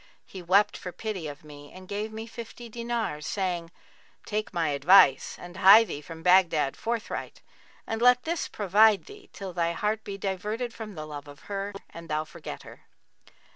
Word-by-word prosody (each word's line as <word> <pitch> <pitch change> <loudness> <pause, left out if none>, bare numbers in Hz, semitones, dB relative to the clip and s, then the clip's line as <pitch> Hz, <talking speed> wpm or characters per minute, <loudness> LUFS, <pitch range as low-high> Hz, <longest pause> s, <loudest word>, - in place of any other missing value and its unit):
He 190 - -9
wept 190 +4 +3
for 180 - -7
pity 195 -5 -5
of 145 0 -9
me 145 -1 -12
and 185 0 -12
gave 210 +2 -4
me 220 +1 -6
fifty 235 +1 -9
dinars, 235 -9 -3
saying, 180 -4 -2 0.6
'Take 215 0 -3
my 165 -3 0
advice 145 0 +5
and 175 +1 -10
hie 195 +4 +9
thee 165 -9 -6
from 160 +2 -10
Baghdad 175 -6 +4
forthright 230 -1 -4 0.4
and 225 0 -3
let 250 0 +5
this 335 +1 -2
provide 210 +1 +4
thee 415 -1 -14
till 195 -2 -7
thy 170 -1 0
heart 210 +4 -1
be 200 -1 -6
diverted 210 +5 -3
from 215 -4 -8
the 155 -1 -6
love 145 -1 -8
of 145 -1 -13
her 200 0 -4 0.2
and 170 0 -11
thou 155 0 0
forget - - -9
her. - - -13
195 Hz, 175 wpm, -27 LUFS, 165-220 Hz, 0.6 s, hie